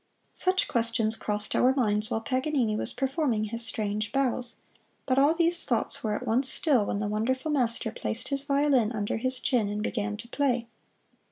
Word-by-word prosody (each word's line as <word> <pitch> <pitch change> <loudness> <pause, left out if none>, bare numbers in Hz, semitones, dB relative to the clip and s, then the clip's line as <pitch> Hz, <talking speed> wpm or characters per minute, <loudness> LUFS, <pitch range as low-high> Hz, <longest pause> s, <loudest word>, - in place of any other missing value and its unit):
Such 370 +1 +1
questions 230 -1 +1
crossed 210 -1 -2
our 260 +1 +4
minds 215 -4 +1
while 225 -2 -1
Paganini 255 -2 0
was - - -1
performing 265 -4 0
his 230 +2 -3
strange 215 -1 -1
bows, 255 -3 -1 0.5
but 260 0 +2
all 290 +4 +4
those 340 +1 +4
thoughts - - -1
were 215 -2 0
at - - -5
once 255 +4 +1
still 260 -10 +2
when - - -1
the 210 - -2
wonderful 260 +8 -1
master 245 -5 0
placed - - -4
his 275 -1 -1
violin 280 -5 +2
under 205 -1 -2
his 255 +2 -2
chin 245 -7 +1
and 210 +1 -3
began 210 -2 -2
to 230 +2 -10
play. 250 -4 0
240 Hz, 180 wpm, -27 LUFS, 215-275 Hz, 0.5 s, our